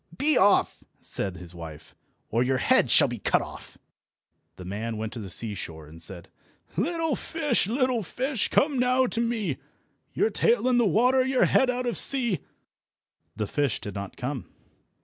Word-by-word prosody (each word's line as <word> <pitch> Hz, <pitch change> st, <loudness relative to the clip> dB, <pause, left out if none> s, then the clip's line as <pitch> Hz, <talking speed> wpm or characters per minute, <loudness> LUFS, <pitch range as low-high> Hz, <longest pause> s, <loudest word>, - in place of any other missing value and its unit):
"Be 305 Hz, +1 st, +2 dB
off!" 200 Hz, +1 st, +3 dB, 0.2 s
said 95 Hz, -3 st, -4 dB
his 90 Hz, -1 st, -9 dB
wife, 80 Hz, -2 st, -10 dB, 0.4 s
"or 115 Hz, -, +1 dB
your 130 Hz, +1 st, +1 dB
head -, -, +3 dB
shall -, -, +6 dB
be -, -, -5 dB
cut -, -, +1 dB
off." -, -, -11 dB, 0.8 s
The 90 Hz, -, -10 dB
man 110 Hz, +4 st, -4 dB
went 110 Hz, 0 st, -4 dB
to 120 Hz, -, -6 dB
the 100 Hz, -3 st, -7 dB
seashore 85 Hz, -6 st, -4 dB
and 80 Hz, +2 st, -12 dB
said— 85 Hz, 0 st, -2 dB, 0.5 s
"Little 325 Hz, -, 0 dB
fish, 295 Hz, -, 0 dB
little 255 Hz, 0 st, +1 dB
fish, 255 Hz, -, -2 dB
come 280 Hz, -2 st, +2 dB
now 255 Hz, +1 st, +3 dB
to 235 Hz, -1 st, -1 dB
me, 230 Hz, -3 st, -1 dB, 0.6 s
Your 430 Hz, -, +2 dB
tail 465 Hz, -, +2 dB
in 250 Hz, -1 st, +3 dB
the 235 Hz, -, +3 dB
water, 250 Hz, +8 st, +3 dB
your 260 Hz, 0 st, +2 dB
head 265 Hz, -, +3 dB
out 250 Hz, 0 st, -1 dB
of 240 Hz, -, +1 dB
sea!" 240 Hz, -8 st, +3 dB, 1.0 s
The 105 Hz, -, -2 dB
fish 140 Hz, +2 st, -1 dB
did 105 Hz, -, -7 dB
not 100 Hz, 0 st, -7 dB
come. 130 Hz, 0 st, -4 dB
205 Hz, 170 wpm, -26 LUFS, -, 1.0 s, shall